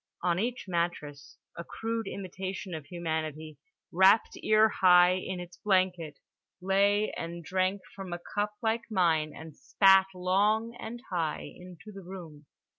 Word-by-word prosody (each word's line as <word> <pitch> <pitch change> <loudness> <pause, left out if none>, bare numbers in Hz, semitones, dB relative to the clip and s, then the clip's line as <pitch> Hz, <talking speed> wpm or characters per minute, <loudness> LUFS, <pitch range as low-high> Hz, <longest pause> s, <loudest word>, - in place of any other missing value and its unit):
On 175 -1 +1
each 240 +4 -3
mattress 170 -5 -3 0.2
a 170 - -6
crude 225 +3 -4
imitation 190 0 -6
of 155 -3 -7
humanity, 160 -3 -4 0.3
wrapped 190 +5 +4
ear 215 0 +5
high 180 -3 +5
in 185 0 -4
its 175 0 -10
blanket, 185 -6 0 0.4
lay 200 +3 +2
and 170 +1 -6
drank 185 +2 0
from 195 -2 -8
a 175 - -3
cup 205 +4 -3
like 225 +1 -1
mine 165 -7 +1
and 160 -1 -11
spat 195 -1 +4
long 210 +6 +1
and 240 +2 -7
high 165 -4 -2
into 180 +3 -12
the 195 -1 -10
room. 170 -5 -11
185 Hz, 140 wpm, -29 LUFS, 170-200 Hz, 0.4 s, ear